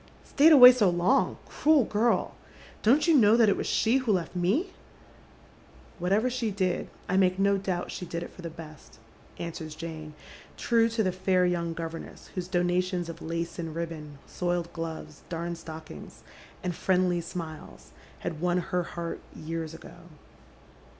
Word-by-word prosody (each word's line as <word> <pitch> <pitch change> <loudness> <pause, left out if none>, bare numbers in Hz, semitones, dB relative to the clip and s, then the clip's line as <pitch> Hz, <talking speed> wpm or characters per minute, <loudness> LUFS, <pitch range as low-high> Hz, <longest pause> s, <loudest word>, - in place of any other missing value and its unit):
" - - -26
Stayed 305 +3 +6
away 250 -4 +11
so 230 -6 +3
long, 175 +1 +2
cruel 300 -3 +3
girl! 225 +3 +1 0.5
Don't 270 +10 +4
you 335 - +5
know 225 -4 +6
that 225 -3 +5
it 195 - +3
was - - -3 0.2
elie 230 +4 +4
who 255 -4 0
left 180 -3 -1
me? 205 - 0 0.4
" - - -26
" - - -25
Whatever 195 +7 +2
she 250 -3 -1
did, 190 -3 -1 0.2
I 185 - +1
make 185 -1 +3
no 200 0 +2
doubt 185 -2 -3
she 180 - -6
did 170 0 -4
it - - -9
for - - -12
the 170 - -5
best," 155 -5 -12 0.4
answers 160 -2 -6
Jane, 155 -2 -7 0.4
true 230 -1 +2
to 225 -1 0
the 185 - +1
fair 185 0 +1
young 170 -2 -1
governess 165 0 -7
whose 180 -2 -4
donations 180 -1 0
of 165 - -8
lace 170 +1 -4
and 165 -2 -5
ribbon, 160 -3 -6
soiled 175 -1 -2
gloves, 160 -2 -6
darned 170 0 -4
stockings, 160 -1 -10 0.4
and 180 -1 -1
friendly 180 0 +1
Bmiles, 165 -2 -8 0.3
had 160 -2 -5
won 180 0 +1
her 180 0 -1
heart 170 -1 -5 0.2
years 160 0 -5
ago. 170 - -12
175 Hz, 170 wpm, -28 LUFS, 165-200 Hz, 0.5 s, away